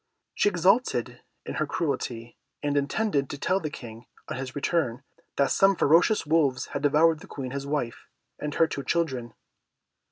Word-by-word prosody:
She 205 - +3
exulted 195 +7 +1 0.2
in - - -5
her - - +1
cruelty, 120 -8 -3 0.3
and 145 -1 0
intended 140 0 0
to 145 - -5
tell 185 +6 +1
the 155 -4 -4
King, 115 -4 -10 0.2
on - - -3
his 130 -1 -6
return, 140 -4 0 0.3
that 140 -1 +2
some 195 0 +4
ferocious 170 +7 +4
wolves 145 -4 +2
had - - -2
devoured 155 +2 +4
the 195 - -13
Queen 130 -7 -6
his 140 +1 -4
wife, 140 -5 -3 0.3
and 150 -1 -4
her 165 - +5
two 140 -3 -5
children. 130 -6 -1
145 Hz, 165 wpm, -27 LUFS, 130-165 Hz, 0.3 s, her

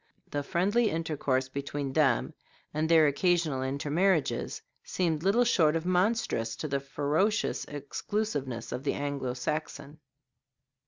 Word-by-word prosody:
The 145 - -1
friendly 205 +10 +1
intercourse 145 -5 -1
between 140 0 -4
them, 135 -6 +2 0.4
and 155 +1 0
their 160 -2 +6
occasional 155 -2 +1
intermarriages, 150 +6 0 0.2
seemed 165 -4 -1
little 205 +7 +3
short 165 -9 +3
of 165 +1 -1
monstrous 180 - +1
to 155 - -4
the 140 -1 0
ferocious 150 +10 0
exclusiveness 145 - -3
of 125 +2 -4
the 145 - 0
Anglo 140 -3 -3
Saxon. 150 +2 -4
150 Hz, 120 wpm, -29 LUFS, 140-175 Hz, 0.4 s, their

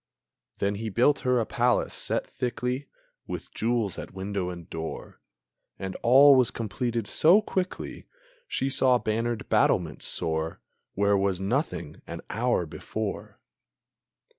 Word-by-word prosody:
Then 100 0 0
he 110 - -2
built 125 +8 +3
her 125 -1 +2
a 115 - 0
palace, 120 +2 +1
set - - -1
thickly 125 +3 -3 0.4
With - - -6
jewels 115 -3 0
at - - -9
window 95 -1 -3
and 85 -2 -8
door; 80 -1 -7 0.6
And 95 0 -5
all 135 +4 +8
was 130 -3 +4
completed 115 0 -2
so 170 - +5
quickly 185 -3 -4 0.4
She 135 - -1
saw 130 -2 +4
bannered 115 0 -2
battlements - - +1
soar 80 0 -2 0.4
Where 100 0 +3
was 95 -2 +1
nothing 125 +11 -2
an - - -6
hour - - +1
before. - - -5
115 Hz, 130 wpm, -27 LUFS, 100-125 Hz, 0.6 s, all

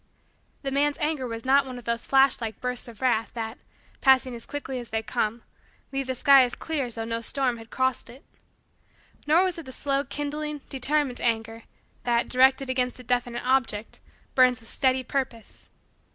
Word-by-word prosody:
The 270 - -2
man's 285 +1 +1
anger 300 -4 -1
was 230 0 -6
not 275 +2 +5
one 255 -1 -7
of 245 - -9
those 235 0 -2
flash 270 -1 +4
like 220 -2 -4
bursts 250 -1 -2
of 235 0 -10
wrath, 230 -3 +1
that, 225 0 -5 0.4
passing 265 -2 +4
as 230 -1 -9
quickly 270 -3 -4
as 240 -1 -8
they 220 0 -2
come, 220 +1 -2 0.5
leave 270 -1 -2
the 260 - -2
sky 275 +1 +7
as 245 - -2
clear 310 -5 -2
as 240 - -5
though 225 -1 -3
no 230 0 -2
storm 255 0 0
had 225 0 -12
crossed 260 -1 -1
it. 250 +4 -14 1.0
Nor 325 +5 +5
was 365 -3 -1
it 315 - -10
the - - -7
slow 275 +1 -1
kindling, 295 +1 -4
determined, 275 -1 0
anger, 225 -1 -1 0.4
that, 235 -1 +1
directed 265 +1 +4
against 255 -1 -1
a - - -10
definite 245 0 -1
object, 250 -5 0 0.3
burns 255 -1 +5
with 225 - -12
steady 260 -1 +2
purpose. 250 -4 -4
255 Hz, 185 wpm, -26 LUFS, 235-275 Hz, 1.0 s, sky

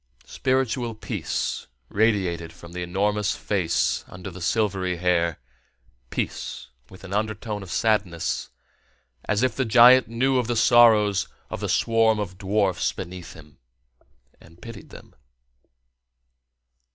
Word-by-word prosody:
Spiritual 125 - -1
peace 110 -1 -3 0.2
radiated 95 - 0
from 85 0 -13
the 90 0 -6
enormous 100 +4 0
face 90 -5 0
under 90 +1 -9
the 90 +1 -10
silvery 95 -2 0
hair, 85 -1 +1 0.7
peace - - -4 0.2
with 95 - -15
an 95 0 -8
undertone 105 0 -2
of 95 - -10
sadness, 100 -7 0 0.8
as 105 +3 0
if 125 -3 +1
the 130 - 0
giant 125 +2 +7
knew 130 +3 +1
of 120 - -2
the 120 - -1
sorrows 110 -4 +5 0.2
of - - -4
the - - -3
swarm 115 -1 +2
of 95 -3 -5
dwarfs 100 -2 0
beneath 90 -1 -8
him, 75 -2 -16 0.8
and 85 +1 -19
pitied 115 -5 -11
them. - - -14
105 Hz, 125 wpm, -24 LUFS, 90-115 Hz, 0.8 s, giant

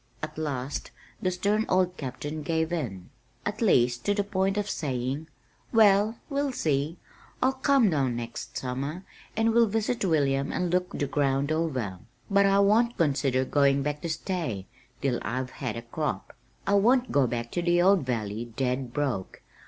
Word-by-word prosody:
At 155 0 -4
last 145 -3 -3 0.3
the 185 - +1
stern 205 +4 0
old 185 -1 +2
Captain 145 +3 -5
gave 160 +2 -1
in, 100 - -4 0.3
at 210 +2 -3
least 125 - +3
to 205 - +2
the 205 - +1
point 195 0 0
of 205 -1 0
saying, 135 0 -2 0.4
"Well, 215 0 +5
we'll 280 -2 -1
see. 155 - 0 0.4
I'll 260 +1 +3
come 265 -5 +3
down 135 -5 +1
next 115 0 -6
summer, 140 +8 -4 0.3
and 225 0 +3
we'll 235 0 +5
visit 225 +2 -1
William 140 -6 +1
and 180 -2 -1
look 180 0 +1
the 145 - 0
ground 140 0 +1
over. 130 - -1 0.3
But 200 0 +5
I 195 0 +4
won't 230 +4 +3
consider 135 -4 +2
going 140 0 +3
back 150 +1 -2
to 170 - -3
stay 160 - -3 0.4
till 130 -3 +1
I've 130 +1 -3
had 120 -4 -4
a 115 - -6
crop. 115 - -4 0.3
I 200 - +1
won't 245 +6 +4
go 140 -3 +3
back 120 0 -3
to 175 - -1
the 175 0 +3
old 190 -3 +5
valley 115 -3 -2
dead 125 -1 -1
broke. 135 -10 -2
155 Hz, 170 wpm, -27 LUFS, 130-200 Hz, 0.4 s, Well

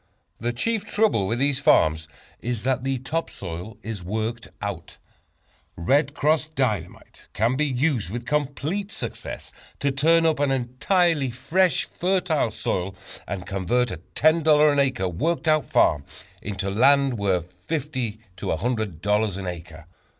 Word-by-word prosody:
The 120 +2 -1
chief 220 - -1
trouble 210 - +1
with 115 - 0
these 140 +1 +2
farms 80 0 +3 0.3
is 120 -2 -3
that 130 0 0
the 135 0 0
top 150 +6 -3
soil 90 +4 -7
is 110 -4 -5
worked 110 +5 -3
out. 100 -5 -6 0.8
"Red 140 - +1
Cross" 155 +1 +2
Dynamite 105 -10 -3
can 115 +5 +1
be 150 +2 +1
used 130 - 0
with 120 +4 -5
complete 150 +8 -2
success - - -6 0.3
to 140 - +1
turn 165 +5 +3
up 160 -3 +2
an 145 -1 +2
entirely 135 +4 +1
fresh, 165 +10 +1
fertile 180 -7 0
soil, 95 -3 -2 0.3
and 95 -2 -4
convert 100 +6 0
a 90 - -4 0.2
$10 155 -1 +5
an 145 - +1
acre 130 -8 +1
"worked 160 - -1
out 155 -1 +3
farm" 75 - +3 0.4
into 100 -1 -3
land 135 +2 +4
worth 90 -3 0
$50 130 -8 -2 0.2
to - - -5
$100 105 0 0
an 100 - -5
acre. 85 -2 -7
125 Hz, 145 wpm, -24 LUFS, 100-150 Hz, 0.8 s, $10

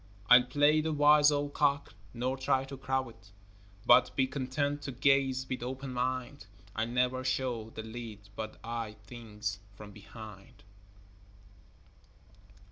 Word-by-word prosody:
I'll 125 +1 +10
play 145 +4 +3
the 160 +1 -1
wise 150 0 +6
old 145 0 -1
cock, 140 -1 +1 0.2
nor 125 +3 -2
try 135 0 +1
to 135 +1 -8
crow 130 -1 -2
it, 100 -3 -18 0.6
But 125 +1 +5
be 135 - +3
content 140 +2 -2
to 140 - -5
gaze 135 0 +2
with 130 - -4
open 130 +1 -5
mind; 130 -1 -3 0.3
I'll 110 - -1
never 125 +1 0
show 125 -4 -2
the 110 - -8
lead 110 -2 -8
but 110 0 -6
eye 115 -2 -4
things 105 -4 -6 0.2
from 105 0 -11
behind. 105 -1 -12
130 Hz, 135 wpm, -31 LUFS, 115-140 Hz, 0.6 s, I'll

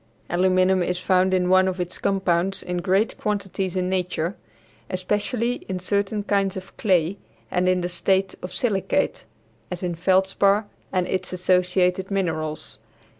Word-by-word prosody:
Aluminum 185 +1 +3
is 180 0 0
found 185 +1 +2
in 185 -1 +2
one 185 +1 +5
of 185 0 -2
its 180 0 -4
compounds 190 -1 +1
in 180 0 -3
great 195 +4 +1
quantities 195 -3 -2
in 180 -1 0
nature, 180 -1 -1 0.5
especially 210 +6 -1
in 185 - -1
certain 200 +3 -1
kinds 195 -2 0
of 190 0 -9
clay 185 -2 +1 0.3
and 180 0 +2
in 180 -1 +1
a - - 0
state 190 +2 +1
of 180 - -6
silicate, 215 -7 0 0.4
as 180 0 -5
in 175 -1 -1
feldspar 190 +4 +2 0.3
and 185 -1 +1
its 185 -1 -2
associated 180 +1 +2
minerals. 165 -6 -2
185 Hz, 145 wpm, -24 LUFS, 180-195 Hz, 0.5 s, one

